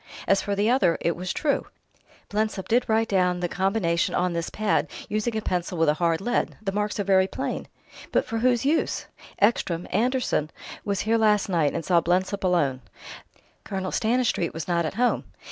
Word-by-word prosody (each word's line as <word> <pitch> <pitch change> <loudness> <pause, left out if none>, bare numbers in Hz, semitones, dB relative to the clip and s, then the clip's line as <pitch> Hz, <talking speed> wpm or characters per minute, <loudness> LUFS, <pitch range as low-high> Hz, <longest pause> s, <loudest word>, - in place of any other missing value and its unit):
As 195 +1 +4
for 200 - -2
the 205 +2 +1
other, 225 -9 +3
it 170 - 0
was 180 +1 -4
true: 290 -2 0 0.6
Blensop 210 -2 -1
did 240 +2 +2
write 220 +1 +2
down 180 -2 +2
the 175 - -1
combination 190 -2 0
on 180 0 +1
this 170 0 -2
pad, 215 -1 0 0.2
using 215 +2 -1
a 215 - -3
pencil 180 0 -2
with 165 -1 +3
a - - +4
hard 165 +1 0
lead; 240 +4 -1
the 200 -3 -3
marks 210 +1 -2
are - - +1
very 190 -1 +4
plain." - - -4 0.4
"But - - +2
for 225 - -3
whose 245 +1 +2
use?" 305 +3 +1 0.3
"Ekstrom 185 -5 +1
Anderson 235 - +1 0.3
was 200 -2 -1
here 225 +1 +2
last 210 -2 +3
night, 165 -5 +2
and 165 - -3
saw 175 -2 +4
Blensop 185 +3 0
alone. 145 -8 +1 0.8
Colonel 190 -2 -4
Stanistreet 225 -7 0
was 165 - -5
not 170 -2 +1
at 155 - -6
home. 245 +2 +1
195 Hz, 185 wpm, -25 LUFS, 175-220 Hz, 0.8 s, As